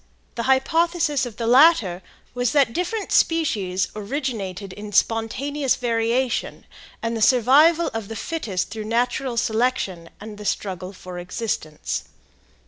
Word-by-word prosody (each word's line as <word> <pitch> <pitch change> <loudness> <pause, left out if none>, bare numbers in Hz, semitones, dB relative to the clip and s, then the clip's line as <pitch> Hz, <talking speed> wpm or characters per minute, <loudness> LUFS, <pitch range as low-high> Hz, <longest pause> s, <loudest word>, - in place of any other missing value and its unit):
The 235 - -3
hypothesis 320 +1 +2
of 225 -3 -11
the 230 - -3
latter 240 - +5 0.3
was 245 -1 0
that 275 -6 +3
different 375 - -2
species 200 - +1
originated 210 -5 -4
in 210 +1 -8
spontaneous 260 +7 +1
variation, 235 +1 -1 0.4
and 230 0 -1
the 225 - -3
survival 280 +9 +5
of 225 -3 -4
the 225 - -7
fittest 230 - -3
through 220 -1 -5
natural 245 +2 -1
selection 220 -7 0
and 210 0 -9
the 210 - -8
struggle 185 -2 -3
for 185 -2 -9
existence. 175 -4 -4
230 Hz, 130 wpm, -23 LUFS, 205-270 Hz, 0.4 s, latter